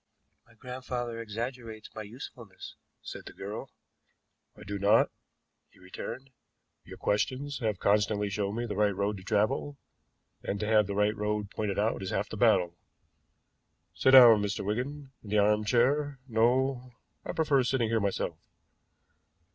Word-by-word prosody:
"My 115 - -22
grandfather 125 -1 -5
exaggerates 115 0 -6
my 110 - -6
usefulness," 110 -2 -10 0.3
said - - -8
the - - -9
girl. - - -7 0.9
"I - - -11
do 100 +1 -5
not," 100 +2 +4 0.6
he - - -26
returned. 110 +8 -8 0.5
"Your - - -11
questions 135 +7 -1
have 110 -5 -1
constantly 105 +1 +1
shown 100 0 -2
me 120 +1 -2
the 105 -3 -4
right 105 -1 +2
road 100 +1 -1
to 95 - -11
travel, 120 +8 0 0.6
and 100 - -3
to 105 - -2
have 105 -1 +3
the 100 - -3
right 105 +1 +2
road 105 -1 -2
pointed 105 -2 -3
out 105 +1 0
is 95 - -4
half 105 +2 -2
the - - -6
battle. 90 -7 +3 1.1
Sit 130 - +3
down, 120 -5 +9
Mr. 105 -1 -2
Wigan 135 +6 -3
in 105 - -10
the 105 - +1
arm 105 +1 +3
chair 135 +5 +2
no, 125 +2 +1 0.3
I - - -4
prefer 150 -4 +2
sitting 120 -2 0
here 115 0 +2
myself. 100 -2 -2
110 Hz, 155 wpm, -29 LUFS, 105-125 Hz, 1.1 s, down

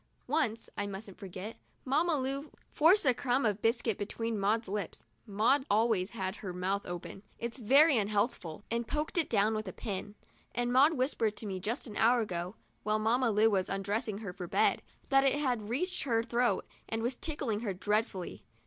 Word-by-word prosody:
Once, 250 -6 0
I 205 - -2
mustn't 195 0 -8
forget, 195 +3 -7 0.3
Mamma 310 +5 +2
Lu 275 +3 -3 0.2
forced 335 +5 +5
a 255 - +6
crumb 250 +1 0
of 210 -1 0
biscuit 225 -2 +1
between 225 +1 -3
Maud's 215 +3 +1
lips 200 -2 -4 0.2
(Maud 230 +7 +3
always 210 -3 +2
has 190 -3 -4
her 185 -3 -6
mouth 190 +3 -1
open 175 +2 -6
— - - -34
it's 235 +3 -5
very 275 +5 +6
unhealthful), 205 -4 -1
and 235 0 -1
poked 300 +1 -2
it 320 - 0
down 215 0 +3
with 215 -1 -3
a - - -3
pin; 205 -1 -5 0.4
and 245 0 0
Maud 280 +5 +6
whispered 250 -6 0
to - - -5
me 190 -2 -3
just 225 +8 -2
an 215 -4 -7
hour 240 +2 +5
ago, 180 -1 -4 0.3
while 215 +1 +1
Mamma 235 +3 +2
Lu 220 +1 +4
was 190 -2 +1
undressing 200 +2 -2
her 205 -4 -6
for 180 -1 -6
bed, - - +2 0.3
that 270 -1 +5
it 275 0 +3
had 250 -8 -1
reached 360 +10 -1
her 230 -4 +1
throat 240 +1 +1 0.2
and 225 0 -2
was 245 +2 0
tickling 275 -8 -2
her 220 -3 -2
dreadfully. 205 -1 -1
225 Hz, 190 wpm, -31 LUFS, 200-255 Hz, 0.4 s, a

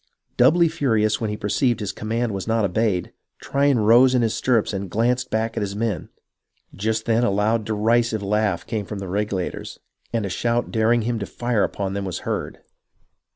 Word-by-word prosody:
Doubly 165 +8 +5
furious 115 -10 +1
when 110 - -1
he 105 - -3
perceived 120 +4 +1
that - - -5
his 100 - -2
command 115 +4 -2
was 95 +1 -4
not 115 -2 +2
obeyed, 100 -1 0 0.3
Tryon 140 -1 +1
rose 120 +4 +5
in 125 - +3
his 110 - +1
stirrups 115 -5 +1
and 100 -1 -4
glanced 120 +5 0
back 110 +1 -1
at - - -2
his 100 -1 -3
men. 110 -2 -2 0.6
Just 110 +2 -2
then 115 +1 +2
a 120 - +3
loud 105 +3 +1
derisive 110 +1 +1
laugh 105 -3 0
came 110 -4 -3
from 105 - -5
the 100 -1 -6
Regulators, 100 -1 -3 0.3
and 115 -3 -1
a - - -3
shout 120 +4 -1
daring 115 0 +2
him 115 0 -1
to 100 - -4
fire 120 -3 0
upon 95 -1 -2
them 100 0 -3
was 95 - -4
heard. - - -3
110 Hz, 195 wpm, -22 LUFS, 105-120 Hz, 0.6 s, Doubly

